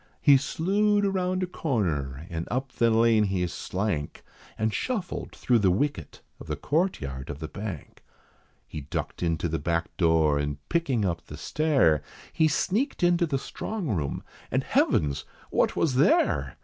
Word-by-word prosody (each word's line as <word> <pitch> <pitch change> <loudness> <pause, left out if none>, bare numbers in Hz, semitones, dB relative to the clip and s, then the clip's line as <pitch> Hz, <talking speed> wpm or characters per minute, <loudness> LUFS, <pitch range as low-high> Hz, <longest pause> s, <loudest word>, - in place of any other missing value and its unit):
He 145 - +6
slewed 200 +9 +2
around 185 -1 0
a - - +2
corner, 85 - -2
and 85 0 -4
up 130 +2 -2
the 115 -3 +2
lane 115 -1 +4
he 95 -2 0
slank, 90 -2 -3 0.3
And 110 0 0
shuffled 215 -9 -3
thro' 120 -2 +2
the 100 -3 +3
wicket 140 +11 -1 0.2
of - - -11
the - - -2
courtyard 75 - -1
of 75 - -5
the 80 +1 -6
Bank. 100 -4 -7 0.6
He 75 - -6
ducked 70 - -5
into 85 -1 0
the 80 0 -2
back 85 -1 -2
door, 80 -4 +3
and 75 -1 -2
picking 140 -11 +1
up 85 -2 -3
the 75 - -8
stair, 135 - +2 0.3
He 160 - +3
sneaked 200 - 0
into 175 0 +3
the 140 -3 0
strong 195 +5 -5
room, 75 - -2 0.3
and, - - 0
heavens! 70 -2 +1 0.3
what - - +2
was 155 -5 +1
there? 160 - +2
110 Hz, 160 wpm, -27 LUFS, -, 0.6 s, He